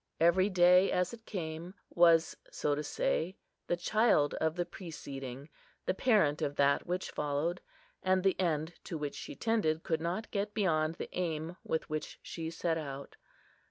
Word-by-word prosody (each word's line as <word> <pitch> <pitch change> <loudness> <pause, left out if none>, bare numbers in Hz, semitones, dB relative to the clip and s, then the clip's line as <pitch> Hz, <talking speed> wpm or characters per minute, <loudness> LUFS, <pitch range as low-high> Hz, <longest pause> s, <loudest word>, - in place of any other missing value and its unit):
Every 175 +4 +4
day, 180 0 +6
as 180 +4 +1
it 230 -1 -11
came, 170 0 -5 0.2
was, 170 -2 +5
so 145 - 0
to 145 - -1
say, 175 +4 -1 0.3
the 175 - +1
child 175 -5 +3
of 160 0 +1
the 175 -1 -1
preceding, 140 -7 -7 0.4
the - - +1
parent 190 - +3
of 145 - -1
that 140 0 +3
which 180 +1 -2
followed; 150 +4 -1 0.4
and 185 0 +2
the 195 -1 +2
end 160 -2 0
to 165 - -4
which 145 -1 -3
she - - -7
tended 170 -8 +1
could 160 -1 0
not 175 +6 -3
get 205 0 -2
beyond 160 -6 +1
the - - -7
aim 165 -1 -2
with 160 - -2
which 155 -1 -4
she 160 -1 -5
set 165 0 -1
out. 140 -2 -7
165 Hz, 165 wpm, -32 LUFS, 155-185 Hz, 0.4 s, day